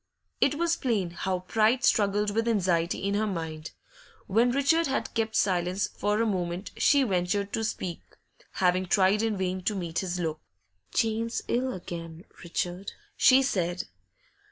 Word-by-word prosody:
It 280 Hz, -, +3 dB
was 340 Hz, +2 st, +1 dB
plain 210 Hz, -9 st, -1 dB
how 185 Hz, +1 st, -2 dB
pride 220 Hz, +6 st, +2 dB
struggled 205 Hz, 0 st, +2 dB
with 225 Hz, +2 st, 0 dB
anxiety 180 Hz, -7 st, +1 dB
in 200 Hz, +1 st, 0 dB
her 215 Hz, +1 st, +1 dB
mind. 160 Hz, -4 st, -4 dB, 0.6 s
When 230 Hz, +5 st, +3 dB
Richard 280 Hz, +6 st, +2 dB
had 270 Hz, -, -2 dB
kept 220 Hz, -1 st, -1 dB
silence 185 Hz, 0 st, +1 dB
for 210 Hz, +1 st, 0 dB
a 230 Hz, -, +2 dB
moment, 180 Hz, -2 st, -2 dB
she 285 Hz, -2 st, +4 dB
ventured 200 Hz, -1 st, -1 dB
to 225 Hz, -, -1 dB
speak, 185 Hz, -5 st, -3 dB, 0.5 s
having 185 Hz, 0 st, +1 dB
tried 195 Hz, +2 st, +3 dB
in 225 Hz, -2 st, 0 dB
vain 185 Hz, 0 st, -2 dB
to 210 Hz, -, +1 dB
meet 170 Hz, -3 st, -2 dB
his 180 Hz, -1 st, -3 dB
look. 160 Hz, -2 st, -3 dB, 0.5 s
'Jane's 225 Hz, +1 st, 0 dB
ill 255 Hz, +2 st, 0 dB
again, 170 Hz, -3 st, -7 dB, 0.2 s
Richard,' 175 Hz, +2 st, -3 dB, 0.2 s
she 265 Hz, +1 st, +6 dB
said. 180 Hz, -8 st, -1 dB
200 Hz, 155 wpm, -27 LUFS, 180-225 Hz, 0.6 s, she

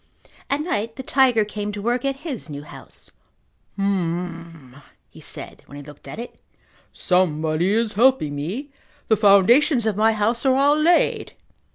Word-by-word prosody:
At 280 Hz, +2 st, 0 dB
night 230 Hz, -, -3 dB
the 265 Hz, -, -7 dB
tiger 250 Hz, -5 st, +3 dB
came 210 Hz, 0 st, -5 dB
to 205 Hz, -, -6 dB
work 240 Hz, +4 st, -1 dB
at 275 Hz, 0 st, -2 dB
his 260 Hz, -, -5 dB
new 145 Hz, -1 st, -7 dB
house. -, -, -11 dB, 0.7 s
"H'm," 170 Hz, -7 st, -3 dB, 0.3 s
he -, -, -15 dB
said -, -, -8 dB
when 140 Hz, -, -12 dB
he 145 Hz, -, -9 dB
looked 145 Hz, 0 st, -14 dB
at -, -, -8 dB
it. 235 Hz, +2 st, -9 dB, 0.5 s
"Somebody 165 Hz, -1 st, 0 dB
is 225 Hz, 0 st, 0 dB
helping 225 Hz, -, +2 dB
me. 205 Hz, -, -5 dB, 0.4 s
The 220 Hz, -, +5 dB
foundations 225 Hz, -, +4 dB
of 220 Hz, -3 st, 0 dB
my 220 Hz, +1 st, +3 dB
house 220 Hz, +3 st, 0 dB
are 265 Hz, -2 st, +3 dB
all 285 Hz, +2 st, +4 dB
laid." 330 Hz, +3 st, +2 dB
210 Hz, 160 wpm, -22 LUFS, 170-260 Hz, 0.7 s, The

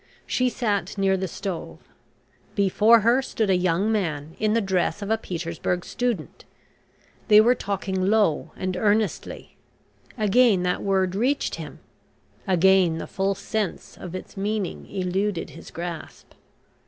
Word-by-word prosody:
She 255 Hz, 0 st, +1 dB
sat 210 Hz, -5 st, -2 dB
near 195 Hz, -1 st, +2 dB
the 190 Hz, 0 st, -2 dB
stove. 165 Hz, -, -5 dB, 0.8 s
Before 210 Hz, +4 st, +5 dB
her 235 Hz, +5 st, +4 dB
stood 220 Hz, -6 st, -1 dB
a -, -, +4 dB
young 180 Hz, +4 st, +1 dB
man 160 Hz, -7 st, -2 dB
in 215 Hz, 0 st, +1 dB
the 230 Hz, -, +3 dB
dress 195 Hz, 0 st, 0 dB
of 200 Hz, -, -3 dB
a 220 Hz, -, +3 dB
Petersburg 170 Hz, -1 st, -3 dB
student. 240 Hz, -10 st, -3 dB, 0.8 s
They 210 Hz, -1 st, +8 dB
were 235 Hz, +3 st, +6 dB
talking 190 Hz, -4 st, -2 dB
low 205 Hz, -8 st, +2 dB
and 185 Hz, -1 st, -3 dB
earnestly. 210 Hz, +2 st, -1 dB, 0.6 s
Again 215 Hz, -2 st, +4 dB
that 180 Hz, 0 st, 0 dB
word 190 Hz, -2 st, +1 dB
reached 255 Hz, +8 st, 0 dB
him, -, -, -9 dB, 0.7 s
again 185 Hz, -2 st, +4 dB
the -, -, -5 dB
full 195 Hz, +1 st, -1 dB
sense 215 Hz, -4 st, -4 dB
of 180 Hz, 0 st, -8 dB
its 185 Hz, -, -8 dB
meaning 205 Hz, -1 st, -3 dB
eluded 190 Hz, 0 st, -2 dB
his 165 Hz, -, -11 dB
grasp. 170 Hz, -1 st, -7 dB
195 Hz, 140 wpm, -24 LUFS, 180-215 Hz, 0.8 s, They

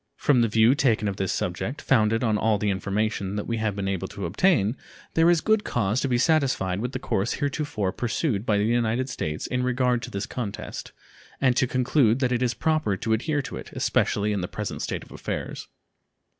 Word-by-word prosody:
From 135 Hz, -5 st, +3 dB
the 115 Hz, -, +3 dB
view 110 Hz, +3 st, +5 dB
taken 115 Hz, -6 st, +2 dB
of 100 Hz, -1 st, -3 dB
this 95 Hz, -2 st, -1 dB
subject, 90 Hz, -, -3 dB
founded 115 Hz, -2 st, +2 dB
on 110 Hz, -3 st, +2 dB
all 110 Hz, 0 st, +2 dB
the 105 Hz, 0 st, 0 dB
information 100 Hz, +1 st, -1 dB
that 105 Hz, -, -3 dB
we 115 Hz, -, -2 dB
have 110 Hz, -3 st, -1 dB
been 100 Hz, -1 st, -3 dB
able 95 Hz, -1 st, -2 dB
to 100 Hz, 0 st, -6 dB
obtain, 105 Hz, -, +2 dB, 0.4 s
there 165 Hz, +1 st, +4 dB
is 170 Hz, -2 st, +4 dB
good 220 Hz, -1 st, +2 dB
cause 115 Hz, +1 st, 0 dB
to -, -, 0 dB
be 125 Hz, -2 st, +2 dB
satisfied 130 Hz, -, +1 dB
with 125 Hz, +4 st, -3 dB
the -, -, -1 dB
course 100 Hz, +4 st, -1 dB
heretofore 140 Hz, -8 st, -2 dB
pursued 120 Hz, -, -1 dB
by 105 Hz, -3 st, +2 dB
the 100 Hz, -, +2 dB
United 120 Hz, +2 st, +1 dB
States 75 Hz, -10 st, -3 dB
in 125 Hz, -, -1 dB
regard 125 Hz, -1 st, +1 dB
to -, -, -6 dB
this 100 Hz, +1 st, -3 dB
contest, 110 Hz, -6 st, -6 dB, 0.5 s
and 130 Hz, -2 st, +3 dB
to 130 Hz, -, +2 dB
conclude 125 Hz, -2 st, +2 dB
that 130 Hz, -2 st, 0 dB
it 120 Hz, 0 st, +1 dB
is 120 Hz, -1 st, +1 dB
proper 155 Hz, -11 st, +1 dB
to 110 Hz, +3 st, -1 dB
adhere 145 Hz, +5 st, 0 dB
to -, -, -6 dB
it, -, -, -9 dB
especially 105 Hz, +1 st, +1 dB
in 100 Hz, -, -1 dB
the 90 Hz, -, -3 dB
present -, -, -5 dB
state -, -, -3 dB
of -, -, -17 dB
affairs. -, -, -5 dB
115 Hz, 210 wpm, -25 LUFS, 100-130 Hz, 0.5 s, view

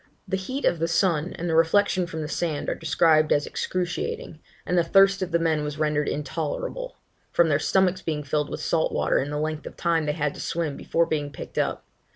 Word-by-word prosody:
The -, -, -1 dB
heat 255 Hz, +9 st, -3 dB
of 170 Hz, -, +2 dB
the 165 Hz, -, +1 dB
sun 170 Hz, -1 st, +1 dB
and 175 Hz, -, -3 dB
the 165 Hz, -, 0 dB
reflection 180 Hz, +3 st, +3 dB
from 160 Hz, -1 st, -5 dB
the -, -, -4 dB
sand 155 Hz, 0 st, -2 dB
are -, -, +1 dB
described 155 Hz, -1 st, +3 dB
as 145 Hz, -, +3 dB
excruciating, 445 Hz, -, -3 dB, 0.3 s
and 180 Hz, -, 0 dB
the 175 Hz, -, +4 dB
thirst 195 Hz, +3 st, +4 dB
of 185 Hz, -, -1 dB
the 170 Hz, -, +2 dB
men 160 Hz, -2 st, +1 dB
was 150 Hz, 0 st, -4 dB
rendered 150 Hz, -1 st, +1 dB
intolerable, -, -, -4 dB, 0.4 s
from 170 Hz, -1 st, +3 dB
their 145 Hz, -1 st, +3 dB
stomachs 185 Hz, +2 st, +2 dB
being 155 Hz, -4 st, -3 dB
filled 150 Hz, +1 st, -1 dB
with -, -, -5 dB
salt 160 Hz, -1 st, +1 dB
water -, -, +1 dB
in 140 Hz, -, -2 dB
the 150 Hz, -, -3 dB
length 155 Hz, 0 st, -3 dB
of -, -, -10 dB
time 165 Hz, -3 st, +1 dB
they 150 Hz, -, +1 dB
had 150 Hz, -2 st, -1 dB
to -, -, -8 dB
swim 165 Hz, -4 st, -2 dB
before 170 Hz, -, +1 dB
being 145 Hz, -3 st, -2 dB
picked 145 Hz, -, -6 dB
up. -, -, -1 dB
165 Hz, 220 wpm, -25 LUFS, 150-180 Hz, 0.4 s, the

